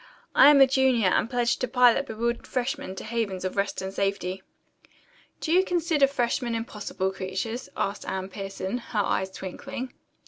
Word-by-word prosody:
I 275 - +8
am 290 -1 +7
a - - +10
junior 260 -6 +3
and 215 - +1
pledged 245 -2 0
to 255 - +1
pilot 250 +2 +4
bewildered 235 +2 -2
freshmen 260 -4 -3
to - - -7
havens 215 -5 -2
of 185 - -3
rest 200 -1 -1
and 190 0 -5
safety." 195 -2 -2 1.0
"Do 315 - -3
you 365 +2 +5
consider 335 -6 +2
freshmen 245 -2 -1
impossible 210 -4 -3
creatures?" 190 +6 -4
asked 200 +1 -2
Anne 190 0 -3
Pierson, 195 +3 -4
her 230 -2 -4
eyes 190 0 0
twinkling. 255 +8 -7
230 Hz, 165 wpm, -26 LUFS, 195-265 Hz, 1.0 s, a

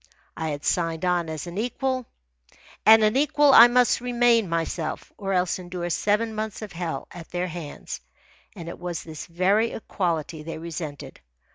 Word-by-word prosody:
I 160 -1 -3
had 145 -1 -5
signed 165 -1 0
on 175 -2 +1
as 155 0 -5
an 175 +3 -5
equal, 255 +2 -2 0.8
and 220 0 +9
an 215 +2 +3
equal 290 0 +4
I 235 -1 +11
must 245 0 +3
maintain 240 -4 +3
myself, 165 -1 -3
or 195 -2 -4
else 180 -1 +1
endure 175 -1 -5
seven 210 +5 +1
months 215 0 -4
of 210 - -7
hell 165 -5 -4
at 170 -2 -10
their 180 0 -2
hands. 160 -3 -7 0.5
And 170 -4 -8
it 170 - -7
was 175 -1 -4
this 160 -2 -8
very 190 +7 +2
equality 165 -7 -2
they 165 +1 -6
resented. 155 - -7
180 Hz, 165 wpm, -25 LUFS, 165-220 Hz, 0.8 s, I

